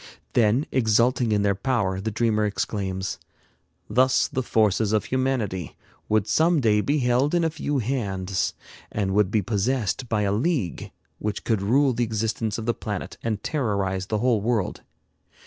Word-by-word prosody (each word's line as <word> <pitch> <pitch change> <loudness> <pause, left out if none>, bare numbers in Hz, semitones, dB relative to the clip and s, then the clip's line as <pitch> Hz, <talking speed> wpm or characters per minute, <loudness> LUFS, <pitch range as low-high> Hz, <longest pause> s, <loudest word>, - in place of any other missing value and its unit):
Then, 120 +5 +3
exulting 120 0 +2
in 105 -1 +2
their 100 -1 +3
power, 100 -3 -1
the 110 - -2
dreamer 110 0 +1
exclaims: 95 -2 -2 0.7
"Thus 130 +4 +3
the 130 - -2
forces 110 -3 +2
of 110 - +1
humanity 120 - -1 0.3
would 110 -2 +2
some 165 0 +3
day 105 -5 +3
be 145 +7 +1
held 130 +4 +2
in 170 - +2
a 160 - +1
few 145 -2 -2
hands, 100 -7 -1 0.4
and 95 -2 -1
would 105 -2 +3
be 105 0 +1
possessed 115 +3 -1
by 105 -2 +1
a 100 - +1
league 115 - -1 0.3
which 105 0 -3
could 110 -4 0
rule 130 +6 +3
the 120 +1 0
existence 110 -1 -1
of 115 - -5
the 120 - +1
planet 105 -5 -5
and 110 -3 -3
terrorize 100 - -1
the 110 - 0
whole 115 -1 +2
world. 110 -3 -1
110 Hz, 165 wpm, -24 LUFS, 100-125 Hz, 0.7 s, Then